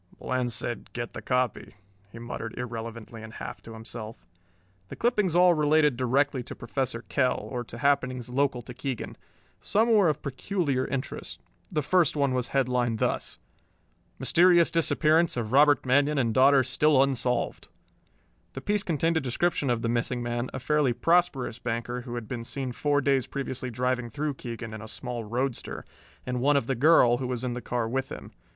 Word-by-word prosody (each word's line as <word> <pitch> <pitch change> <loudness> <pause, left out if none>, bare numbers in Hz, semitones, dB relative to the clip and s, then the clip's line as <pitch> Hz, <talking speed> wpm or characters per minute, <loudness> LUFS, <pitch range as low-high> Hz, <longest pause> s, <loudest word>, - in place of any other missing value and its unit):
"Bland 125 -1 -2
said, 120 +1 -3
'Get 120 -1 -5
the - - -6
copy'," 125 -4 -1 0.4
he 115 - -11
muttered 115 -1 -6
irrelevantly 115 -1 -6
and 110 0 -10
half - - -7
to 115 - -11
himself. 110 0 -9 0.6
The - - -8
clippings 210 -8 +1
all 180 0 +6
related 150 -2 +3
directly 130 +2 +1
to - - -9
Professor 120 -1 -3
Kell 130 -3 +1
or 125 -2 -3
to 120 - -10
happenings 130 -2 +1
local 130 -1 0
to 125 - -9
Keegan. 130 -1 -5 0.5
Some 225 +3 +2
were 200 -6 +5
of 150 0 -2
peculiar 140 -1 -1
interest. 135 0 -5 0.3
The 150 - 0
first 175 -1 +3
one 140 -3 +1
was 125 -1 -1
headlined 125 -4 +1
thus: - - -2 0.8
MYSTERIOUS 175 -1 +4
DISAPPEARANCE 165 -1 +2
OF 115 -2 -3
ROBERT 145 0 +5
MANION 140 +3 +3
AND 115 -4 +1
DAUGHTER 135 +2 +5
STILL 135 +2 +3
UNSOLVED 125 -3 -1 0.9
The 135 - -6
piece 205 +4 0
contained 165 -2 0
a - - +1
description 140 +2 0
of 120 -2 0
the - - +1
missing 120 +1 -1
man, 120 +1 -2
a - - -5
fairly 145 -1 +2
prosperous 165 -6 +1
banker 120 +1 -3
who 120 -1 -7
had 120 -3 -5
been 120 0 -5
seen 130 +2 -3
four 145 +3 +1
days 135 -3 +1
previously 130 -2 -4
driving 125 0 -1
through 145 +5 -2
Keegan 115 -3 -7
in 110 - -7
a 110 - -8
small 120 +1 -5
roadster, 125 +3 -3 0.4
and 125 -1 -2
one 145 +2 +4
of 140 - 0
the 135 - 0
girl, 125 -2 +5
who 130 0 -3
was 125 -1 -3
in 125 -1 -2
the 125 - -5
car 120 0 -2
with 130 +3 -2
him. - - -8
130 Hz, 180 wpm, -27 LUFS, 120-145 Hz, 0.9 s, all